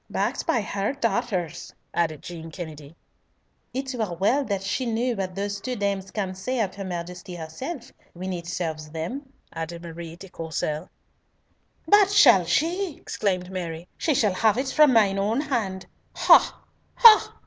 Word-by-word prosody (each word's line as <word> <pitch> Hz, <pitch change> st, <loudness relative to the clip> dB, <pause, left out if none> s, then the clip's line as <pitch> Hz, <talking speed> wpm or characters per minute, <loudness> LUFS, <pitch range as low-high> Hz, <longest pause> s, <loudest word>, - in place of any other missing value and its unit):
"Backed -, -, -2 dB
by 235 Hz, -, +2 dB
her 200 Hz, +3 st, -2 dB
daughter's," 195 Hz, -, -2 dB, 0.2 s
added 160 Hz, -4 st, -1 dB
Jean 165 Hz, -2 st, -8 dB
Kennedy. 155 Hz, -3 st, -9 dB, 0.8 s
"It 265 Hz, +1 st, -4 dB
were 215 Hz, -8 st, -2 dB
well 220 Hz, +11 st, +2 dB
that 200 Hz, -4 st, -2 dB
she 240 Hz, +6 st, -1 dB
knew 235 Hz, +2 st, 0 dB
what 185 Hz, -2 st, -4 dB
those 200 Hz, 0 st, -3 dB
two 250 Hz, +4 st, -3 dB
dames 200 Hz, -3 st, -2 dB
can 195 Hz, -3 st, -3 dB
say 245 Hz, +7 st, -3 dB
of 200 Hz, -4 st, 0 dB
her 200 Hz, -, -6 dB
Majesty 180 Hz, 0 st, -6 dB
herself, 230 Hz, -, -7 dB, 0.2 s
when 185 Hz, +2 st, -5 dB
it 170 Hz, -1 st, -6 dB
serves 160 Hz, -3 st, -4 dB
them," 215 Hz, -, -5 dB, 0.2 s
added 170 Hz, +1 st, -6 dB
Marie 165 Hz, -1 st, -8 dB
de 195 Hz, +3 st, -11 dB
Courcelles. 160 Hz, -1 st, -4 dB, 1.0 s
"That 410 Hz, -1 st, +6 dB
shall 245 Hz, -, +6 dB
she!" 330 Hz, -, 0 dB
exclaimed 185 Hz, -3 st, -2 dB
Mary. 170 Hz, -2 st, -5 dB
"She 305 Hz, -, 0 dB
shall 210 Hz, -5 st, +2 dB
have 215 Hz, +3 st, +2 dB
it 265 Hz, +1 st, -1 dB
from 300 Hz, 0 st, +5 dB
mine 205 Hz, -5 st, +4 dB
own 215 Hz, +5 st, +1 dB
hand! 220 Hz, -11 st, -2 dB, 0.3 s
Ha! -, -, +5 dB, 0.3 s
ha! 450 Hz, -3 st, +8 dB
195 Hz, 160 wpm, -25 LUFS, 170-245 Hz, 1.0 s, ha